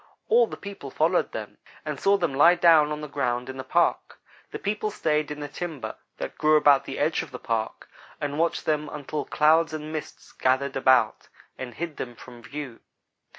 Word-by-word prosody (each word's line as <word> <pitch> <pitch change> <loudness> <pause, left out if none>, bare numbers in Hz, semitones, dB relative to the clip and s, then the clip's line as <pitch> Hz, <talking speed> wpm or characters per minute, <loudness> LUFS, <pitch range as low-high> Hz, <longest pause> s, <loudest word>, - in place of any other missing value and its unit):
All 235 +1 +5
the - - -8
people 200 -1 -8
followed - - +1
them - - -7 0.3
and - - -4
saw 200 +1 +4
them 170 -7 -1
lie 170 +6 +6
down 160 -4 +5
on 150 0 -4
the 150 - -5
ground 125 -3 -2
in 130 - -6
the 130 - -5
park. 130 - +1 0.3
The - - -5
people 210 +1 -2
stayed 155 -7 0
in 150 0 -6
the 145 - -4
timber 160 -1 -6 0.2
that - - -6
grew 155 0 +4
about 145 -2 +5
the - - -6
edge 155 +2 +1
of 165 - -8
the 125 - -7
park, 115 -3 -3 0.3
and 145 +1 -3
watched 170 0 0
them 150 -1 0
until 150 +1 -4
clouds 160 +2 +3
and 155 0 -6
mists 155 - -7
gathered 130 +1 0
about 130 -4 +3 0.3
and 125 -3 -7
hid 170 -3 -5
them 120 -1 -6
from 120 0 -13
view. 140 -2 -7
150 Hz, 195 wpm, -26 LUFS, 130-160 Hz, 0.3 s, lie